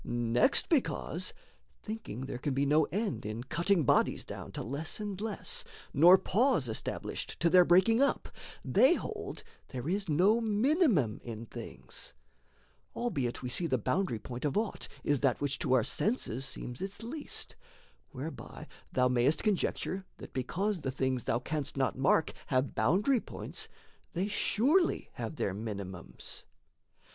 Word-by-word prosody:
Next, 120 - +3
because, 315 -8 +1 0.5
thinking 215 - -6
there 130 -2 -5
can 135 +1 -2
be 140 +1 +2
no 150 +2 +4
end 205 +6 -2
In 110 +3 -4
cutting 170 +6 +1
bodies - - +2
down - - -7
to - - -4
less 140 - -3
and 205 -2 -4
less 215 -2 -2 0.3
Nor 175 +6 +8
pause 210 - +2
established 110 - -3
to 170 0 +3
their 180 -1 +8
breaking 190 +8 +5
up, 280 - +2 0.4
They 275 +7 +5
hold - - -5 0.2
there 130 +1 -6
is 195 +1 -1
no 195 +10 +4
minimum 220 - +2
in 115 -1 -6
things; 65 - -7 0.8
Albeit 135 - -2
we 125 - -3
see 170 +7 +1
the 130 -4 +1
boundary 180 - 0
point 120 +3 -7
of 150 +5 0
aught 215 -1 -1 0.2
Is 145 -2 +2
that 135 -2 +2
which 145 -1 -1
to - - +1
our 125 -3 +5
senses 135 - 0
seems 120 0 -4
its 195 +3 -5
least, 285 +6 -5 0.5
Whereby - - -7 0.3
thou 125 0 +3
mayst 125 +4 +2
conjecture, 195 -2 0
that, - - -11
because 180 - -1
The 135 - -2
things 130 -2 -1
thou 115 - +2
canst 145 +3 -3
not 135 -1 +1
mark 140 +4 +2
have 130 0 +1
boundary 195 - +3
points, - - -4 0.5
They 185 +3 0
surely 275 - +2
have - - -5
their 100 - -1
minimums. 100 -3 -6
155 Hz, 150 wpm, -31 LUFS, 125-210 Hz, 0.8 s, Nor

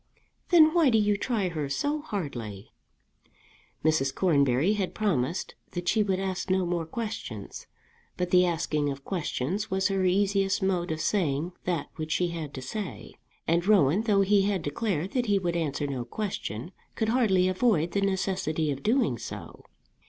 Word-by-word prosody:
"Then 315 -3 +7
why 335 -5 +5
do 225 - +4
you 210 -1 +3
try 205 -3 -1
her 155 -4 -3
so 290 - -1
hardly?" 125 - -5 1.1
Mrs. 135 -4 +2
Cornbury 145 0 +3
had 195 -3 -2
promised 175 -6 -1 0.2
that 175 0 -4
she 220 - +3
would 195 -3 +1
ask 190 0 -3
no 185 0 +2
more 170 -2 -2
questions; 185 - -6 0.5
but 180 -1 -2
the 180 0 +6
asking 155 -4 0
of 140 0 -6
questions 185 +2 -2
was 190 +1 +1
her 195 -1 0
easiest 195 +1 +2
mode 180 -2 0
of 160 0 -2
saying 165 -4 0
that 170 -5 -2
which 155 0 -2
she 180 -1 +1
had 165 -4 -5
to 130 - -6
say. 210 +5 -6 0.3
And 170 +3 +1
Rowan, 190 -3 +4
though 210 -3 +3
he 200 +1 +4
had 195 -3 0
declared 180 +2 -2
that 245 -2 0
he 205 -1 +3
would 175 -3 -1
answer 145 -3 -1
no 135 -3 -3
question, 170 - -4 0.2
could 220 -1 0
hardly 210 -7 +3
avoid 185 -4 +2
the 200 - 0
necessity 185 -5 0
of 140 0 -4
doing 220 - +1
so. - - -8
185 Hz, 165 wpm, -27 LUFS, 155-205 Hz, 1.1 s, Then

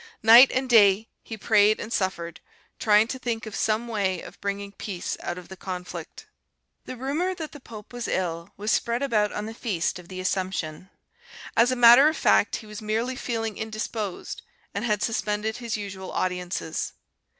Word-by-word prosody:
Night 235 +4 +9
and 260 0 -1
day 215 -3 +5
he 225 - -8
prayed 215 0 +4
and 225 - -5
suffered, 170 -3 -2 0.4
trying 210 0 +5
to 260 - -4
think 230 -3 -3
of 220 - -7
some 220 +2 0
way 200 -5 -1
of - - -12
bringing 200 0 -3
peace 195 -3 -5
out 175 - -4
of 180 - -10
the 190 - -9
conflict. 180 -1 -7 0.6
The 255 - -7
rumour 305 +9 -1
that 320 -4 -6
the 290 - -11
pope 220 -4 -12
was 245 -1 -4
ill 170 -2 -2
was 210 +2 -1
spread 235 +3 0
about 215 -6 +1
on 210 - -4
the 220 - -6
feast 190 -7 -2
of 175 - -13
the 185 0 -7
Assumption. 185 -2 -3 0.7
As 235 +2 +4
a - - +1
matter 245 +3 +8
of 315 -1 0
fact, 210 - +3
he 220 - -7
was 210 +1 -9
merely 225 +4 -1
feeling 225 -4 -3
indisposed, 215 -2 -4 0.3
and - - -3
had 210 -3 0
suspended 215 0 -1
his 235 -2 -3
usual 190 -2 -7
audiences. 180 -3 -3
215 Hz, 180 wpm, -25 LUFS, 190-235 Hz, 0.7 s, Night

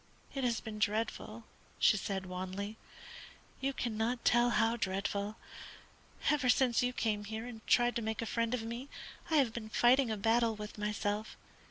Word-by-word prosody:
It 270 - -2
has 235 -3 +1
been 215 -1 -7
dreadful," 215 +1 -1 0.3
she - - +5
said, 195 -1 -3
wanly. 190 +3 -4 0.8
"You 275 +1 0
cannot 235 -1 -2
tell 240 0 +5
how 230 0 +3
dreadful. 200 0 -2 1.0
Ever 280 -4 +2
since 245 -2 +4
you 250 0 +1
came 215 -4 -1
here 220 +2 -5
and 235 -3 -8
tried 240 0 +4
to - - -1
make 220 0 -2
a - - -3
friend 230 +1 0
of 230 - -4
me, 235 +4 -5 0.4
I 320 - +2
have 265 -7 +3
been 220 -2 -6
fighting 245 +3 +4
a 220 - -1
battle 225 +2 +2
with 210 0 -8
myself. 210 0 -2
225 Hz, 170 wpm, -33 LUFS, 210-240 Hz, 1.0 s, she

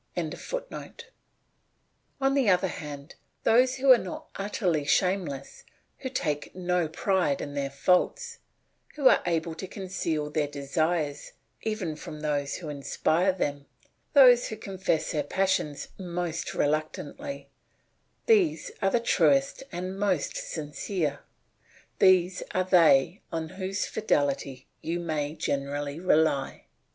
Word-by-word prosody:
] - - -26
On - - -1 2.0
the 270 -6 +3
other 185 +1 +3
hand, 145 -3 -7 0.3
those 255 +3 +4
who 270 0 +4
are 250 - +8
not 185 - -7
utterly 190 -6 -1
shameless, 170 -3 0 0.4
who 260 - -4
take 150 - -2
no 180 -2 0
pride 165 -2 0
in 145 - -5
their 140 -1 -2
faults, 330 - +1 0.6
who 285 -3 +4
are - - +6
able 165 -1 0
to 165 +4 -7
conceal 170 -6 -3
their 150 -1 0
desires 145 +2 -2 0.3
even 210 -8 -2
from 150 0 -9
those 145 -2 -1
who 170 - -7
inspire 155 +5 +1
them, 145 -6 -3 0.5
those 250 -4 +7
who 220 - -5
confess 190 -6 -1
their 155 -4 0
passion 150 -2 0 0.2
most 175 -2 -3
reluctantly, 155 - -2 0.7
these 410 -8 +3
are 195 - +3
the 240 - +2
truest 275 +4 +2
and 185 +2 -5
most 190 -7 0
sincere, 150 0 -3 0.8
these 185 -1 +4
are 185 - +3
they 175 -2 +4
on 160 -1 -3
whose 190 +2 -3
fidelity 140 -9 -1 0.2
you 170 +2 -2
may 155 -3 -2
generally 145 +1 -2
rely. 155 -6 +1
170 Hz, 120 wpm, -27 LUFS, 150-195 Hz, 2.0 s, are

